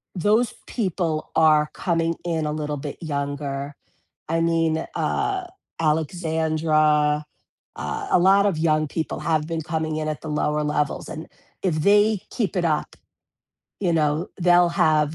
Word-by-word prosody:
those 215 +6 +2
people 175 -8 -2
are 155 -1 +4
coming 165 -2 0
in 165 -3 -1
a 150 - -1
little 150 -1 -3
bit 145 0 -6
younger, 140 -2 -3 0.5
I 165 +1 +1
mean, 165 -1 +1
uh, 390 -3 -1 0.3
Alexandra, 155 -2 +1 0.5
uh, 435 -2 -4
a - - +5
lot 195 +3 +5
of 195 -6 +1
young 155 -1 +2
people 160 +1 -3
have 155 0 0
been 165 -1 -2
coming 160 -1 -2
in 155 0 -2
at 150 -4 -3
the 160 - -6
lower 150 0 0
levels, 150 -1 -1
and 155 - -7 0.4
if 180 -5 +1
they 205 +5 +3
keep 210 -8 -2
it 175 -2 +1
up, 155 -2 -1 0.9
you 180 -4 +1
know, 155 +1 +1
they'll 175 0 +5
have 155 -2 +2
160 Hz, 145 wpm, -23 LUFS, 150-175 Hz, 0.9 s, a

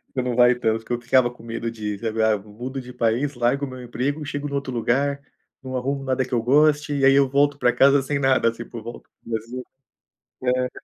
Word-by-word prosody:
Você 130 - +1
não 125 -1 -2
vai 125 0 +5
tanto, 115 -2 -1
que - - -10
eu 120 - -1
ficava 120 +1 +3
com 120 - -15
medo 115 0 -4
de, 105 -3 -5
sabe, 110 -1 -1
"Ah, 110 -1 +3
mudo 120 +7 -7
de 125 0 -11
país, 120 +5 0
largo 125 +4 +1
o - - -8
meu 130 0 -9
emprego, 140 +5 -3
chego 145 0 -4
no 140 - -4
outro 140 -2 -3
lugar, 140 +4 0 0.4
não 130 -1 -6
arrumo 135 +2 -2
nada 130 -1 0
que 130 - -9
eu 120 - +2
goste, 150 +3 +3
e 135 -1 +2
aí 135 - +7
eu 140 -1 +4
volto 145 +1 +2
para 125 -3 +2
casa 140 +1 +5
sem 140 +2 -2
nada, 130 -4 +3
tipo, 115 0 -9
volto 120 +2 -10
para - - -20
o - - -9
Brasil". 115 +3 -4 0.8
É. 125 0 +1
125 Hz, 240 wpm, -23 LUFS, 115-140 Hz, 0.8 s, aí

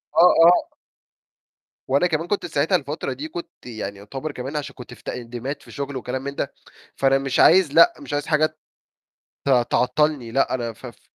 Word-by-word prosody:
آه، 180 +2 +7
آه. 175 +1 +4 1.1
وأنا 140 +7 +3
كمان 165 0 -2
كنت 200 -1 -1
ساعتها 160 +2 +1
الفترة 145 -3 -3
دي 140 +5 -6
كنت 170 +2 -9
يعني 110 -4 -6
يعتبر 135 +9 -6
كمان 135 +2 -6
عشان 145 - -5
كنت 125 - -10
في - - -17
تقديمات 125 +3 -5
في - - -14
شغل 140 0 -5
وكلام 130 +1 -4
من 140 0 -5
ده، - - -3 0.4
فأنا 135 0 +3
مش 135 -1 -2
عايز 175 -4 +6
لأ، 350 - +7
مش 290 - -8
عايز 145 0 -1
حاجة 155 -1 +3 1.0
ت - - 0 0.2
تعطلني، 125 -1 +1
لأ 135 +3 +1
أنا 120 -2 -4
ف - - -13
في - - -11
140 Hz, 185 wpm, -22 LUFS, 125-155 Hz, 1.1 s, آه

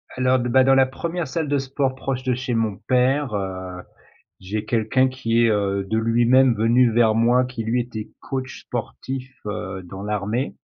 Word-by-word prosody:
Alors, 130 0 +2
b 120 - -2
bah, 130 +2 +5
dans 135 +1 +5
la 135 0 +5
1re 165 +5 -4
salle 160 +3 -2
de 145 - +2
sport 135 0 -1
proche 130 -1 -3
de 125 - +1
chez 125 0 -3
mon 110 -4 0
père, 130 +2 +1
heu, 95 -2 -4 0.6
j'ai 105 +3 -4
quelqu'un 115 +3 +2
qui 120 -3 +1
est, 115 - +4
heu, 100 -2 0
de 110 +2 +1
lui-même 120 +3 +4
venu 115 +2 +3
vers 110 -1 +4
moi, 120 +3 +3
qui 125 -2 -5
lui, 115 +3 +1
était 110 -3 -7
coach 130 -1 -5
sportif, 130 0 -5
heu, 95 -2 -5
dans 95 +2 -9
l'armée 105 +5 -2
120 Hz, 185 wpm, -22 LUFS, 110-130 Hz, 0.6 s, bah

